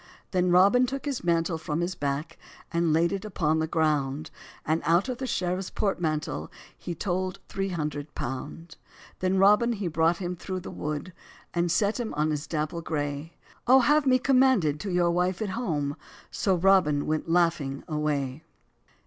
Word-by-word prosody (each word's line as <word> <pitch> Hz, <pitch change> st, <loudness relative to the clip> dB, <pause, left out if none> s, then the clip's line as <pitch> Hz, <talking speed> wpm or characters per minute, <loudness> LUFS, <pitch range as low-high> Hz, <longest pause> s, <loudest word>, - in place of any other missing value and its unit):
Then 180 Hz, -1 st, +2 dB
Robin 200 Hz, +8 st, +5 dB
took 275 Hz, +2 st, -5 dB
his 280 Hz, -8 st, -3 dB
mantle 165 Hz, -1 st, +1 dB
from 155 Hz, 0 st, -3 dB
his 175 Hz, +2 st, -1 dB
back, 145 Hz, 0 st, -3 dB, 0.3 s
And 170 Hz, -1 st, +1 dB
laid 165 Hz, +2 st, +3 dB
it 195 Hz, -1 st, -3 dB
upon 160 Hz, -7 st, 0 dB
the 160 Hz, -, 0 dB
ground: 155 Hz, -2 st, 0 dB, 0.3 s
And 160 Hz, +1 st, +1 dB
out 170 Hz, +3 st, +3 dB
of 250 Hz, -, -4 dB
the 260 Hz, -, -3 dB
sheriffs 185 Hz, -2 st, -1 dB
portmantle 155 Hz, -, -2 dB, 0.2 s
He 175 Hz, -, -6 dB
told 185 Hz, +1 st, -2 dB
three 195 Hz, 0 st, -3 dB
hundred 150 Hz, -4 st, -4 dB
pound. 145 Hz, +6 st, -6 dB, 0.4 s
Then 185 Hz, +1 st, +1 dB
Robin 210 Hz, +5 st, +5 dB
he 200 Hz, -4 st, -3 dB
brought 165 Hz, +1 st, +2 dB
him 180 Hz, -1 st, -4 dB
thorow 185 Hz, +2 st, -5 dB
the 180 Hz, -, -7 dB
wood, 150 Hz, +4 st, -4 dB, 0.4 s
And 175 Hz, 0 st, +1 dB
set 205 Hz, +6 st, +1 dB
him 230 Hz, -9 st, -3 dB
on 155 Hz, +1 st, +1 dB
his 150 Hz, +1 st, -3 dB
dapple 155 Hz, +2 st, -2 dB
gray; 145 Hz, 0 st, -3 dB, 0.3 s
"O 260 Hz, +2 st, +7 dB
have 295 Hz, +2 st, +3 dB
me 255 Hz, -1 st, +5 dB
commanded 255 Hz, -, +3 dB
to 200 Hz, -, -4 dB
your 175 Hz, -1 st, +2 dB
wife 180 Hz, +1 st, 0 dB
at 215 Hz, -, -2 dB
home;" 155 Hz, -10 st, -2 dB, 0.4 s
So 190 Hz, -2 st, +1 dB
Robin 175 Hz, -5 st, +3 dB
went 155 Hz, +1 st, -2 dB
laughing 165 Hz, -5 st, +1 dB
away. 150 Hz, -2 st, -2 dB
170 Hz, 170 wpm, -27 LUFS, 155-195 Hz, 0.4 s, O